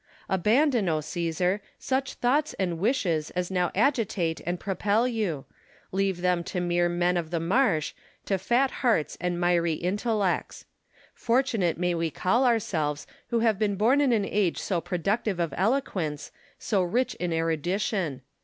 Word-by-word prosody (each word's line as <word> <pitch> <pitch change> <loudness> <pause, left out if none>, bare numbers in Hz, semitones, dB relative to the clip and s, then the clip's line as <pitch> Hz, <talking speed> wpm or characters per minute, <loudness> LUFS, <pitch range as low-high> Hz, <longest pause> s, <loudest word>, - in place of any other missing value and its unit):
Abandon, 220 - +2
O 155 -1 +1
Caesar! 175 +5 -1 0.2
such 265 0 -2
thoughts 285 +5 +1
and 175 -4 -2
wishes 180 - 0
as 180 +1 -2
now 180 -2 +1
agitate 205 - +1
and 175 0 -1
propel 205 +4 +1
you: 205 - -2 0.5
leave 190 -2 0
them 180 -1 +1
to 185 - -3
mere 175 0 +1
men 175 +1 +1
of 165 -2 -3
the 170 0 -1
marsh, 175 - +1 0.3
to 195 -2 0
fat 255 +7 +2
hearts 225 - +2
and 175 -1 -1
miry 175 -2 +2
intellects. 200 +3 -1 0.5
Fortunate 230 -8 +1
may 180 0 0
we 165 -1 -1
call 230 - +1
ourselves 160 -11 0 0.2
to 235 -1 +1
have 220 -3 +2
been 205 -2 0
liorn 245 +8 +4
in 275 -3 +3
an 215 -4 +2
age 195 -4 0
so 180 -4 -1
productive 195 +3 -1
of 170 -2 -1
eloquence, 185 - -1 0.3
so 200 -4 0
rich 235 +9 0
in 175 -1 -1
erudition. 165 - -1
185 Hz, 155 wpm, -27 LUFS, 170-225 Hz, 0.5 s, liorn